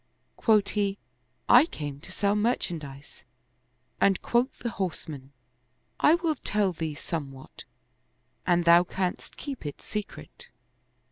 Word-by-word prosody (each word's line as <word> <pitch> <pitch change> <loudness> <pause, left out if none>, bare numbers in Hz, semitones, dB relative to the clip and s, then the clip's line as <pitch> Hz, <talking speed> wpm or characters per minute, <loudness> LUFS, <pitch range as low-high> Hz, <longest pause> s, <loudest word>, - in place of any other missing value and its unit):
Quoth 215 -3 +3
he, 200 -1 0 0.3
" 125 +1 -45
I 250 +6 +7
came 145 - -6
to 180 - -11
sell 200 +2 +1
merchandise 165 - -2 0.4
"; 125 +1 -38
and 195 -2 +4
quoth 240 +3 +1
the 235 - -4
horseman, 155 -8 -5 0.4
" - - -45 0.3
I 310 - +6
will 335 -2 0
tell 210 -8 0
thee 160 -2 -4
somewhat, 140 -4 -7 0.8
an 175 -1 +3
thou 170 +1 +7
canst 180 0 -4
keep 275 -3 -6
it 145 -2 -6
secret." 210 - -7
180 Hz, 135 wpm, -27 LUFS, 145-215 Hz, 0.8 s, I